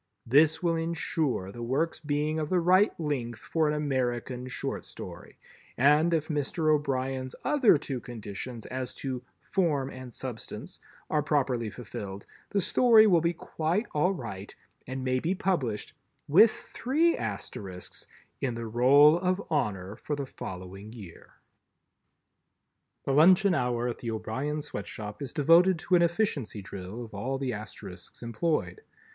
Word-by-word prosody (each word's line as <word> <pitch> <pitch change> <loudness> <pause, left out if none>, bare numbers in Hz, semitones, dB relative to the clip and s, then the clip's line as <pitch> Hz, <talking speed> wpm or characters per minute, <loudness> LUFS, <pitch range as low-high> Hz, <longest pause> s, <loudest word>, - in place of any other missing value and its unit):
This 150 +7 +4
will 170 -1 +2
insure 160 - -1
the 120 - -9
work's 135 +8 0
being 150 +1 -1
of 155 -1 -2
the 185 - +3
right 185 +5 +5
length 130 -7 -2
for 160 +6 0
an 150 - +1
American 130 -3 -1
Short 125 - -4
Story, - - -10 0.4
and, 150 +6 +5
if 160 -2 +1
Mr. 155 +1 +1
O'Brien's 130 -3 -1
other 265 - +5
two 135 -3 -4
conditions 115 0 -7
as 130 0 -5
to 130 -2 -4 0.3
"form 150 -8 +1
and 130 -1 -9
substance" 120 -1 -7 0.3
are 150 - +3
properly 130 -6 0
fulfilled, 100 -4 -7 0.2
the 200 - +1
Story 225 +3 +6
will 175 -6 +5
be 170 +1 +1
quite 165 +8 -1
all 150 +5 +3
right 115 - -6 0.3
and 130 +1 -4
may 130 0 +1
be 175 +8 0
published—with 170 - +2
three 305 +11 0
Asterisks—in 100 +4 -6
the 115 0 -4
Roll 140 +8 +6
of 185 +1 +1
Honor 100 - -1
for 150 - -3
the 140 -1 -3
following 95 -2 -8
year. 100 -8 -12 1.7
The - - 0
luncheon 185 +6 +6
hour 125 -4 0
at 120 - -4
the 120 - -4
O'Brien 130 +7 -2
Sweatshop 105 -6 -7
is 135 -4 -4
devoted 170 +5 +5
to 170 - -4
an 175 - +5
Efficiency 165 - 0
Drill 95 +5 -7
of 110 - -15
all 130 +7 -2
the 135 -2 -2
Asterisks 110 +2 -8
employed. 155 - -1
135 Hz, 140 wpm, -28 LUFS, 120-165 Hz, 1.7 s, Story